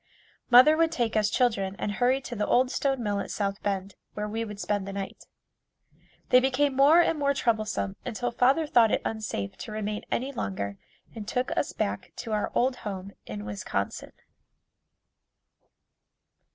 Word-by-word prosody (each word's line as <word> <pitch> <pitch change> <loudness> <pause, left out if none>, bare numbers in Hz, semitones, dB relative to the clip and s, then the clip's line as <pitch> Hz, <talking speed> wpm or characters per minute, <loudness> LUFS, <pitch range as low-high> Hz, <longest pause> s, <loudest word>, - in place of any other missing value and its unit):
Mother 255 +6 +8
would 330 0 +3
take 240 -8 -1
us 210 -1 +3
children 205 -5 +1
and 205 - -2
hurry 250 +5 +2
to 245 - -7
the 210 -1 -1
old 255 +1 +3
stone 270 -3 0
mill 205 -2 0
at 200 - -4
South 200 -1 -2
Bend, 195 -1 -2 0.2
where 210 0 -3
we 225 +2 -2
would 210 -2 -7
spend 205 -2 -1
the 195 - -5
night. 195 0 -6 1.0
They 250 - +7
became 265 +2 +1
more 290 +6 +7
and 330 -2 +1
more 280 -1 +2
troublesome 215 -5 -1
until 245 0 -3
father 265 +7 +3
thought 235 -6 +5
it - - 0
unsafe 210 - -3
to - - -8
remain 210 0 -3
any 265 +3 -1
longer 100 - -4 0.3
and 215 -3 -8
took 250 +3 -1
us - - 0
back - - -3
to 225 - -6
our 210 -1 -1
old 250 +1 +2
home 200 -3 -6 0.2
in 105 -1 -6
Wisconsin. 100 -1 -4
220 Hz, 165 wpm, -27 LUFS, 200-255 Hz, 1.0 s, Mother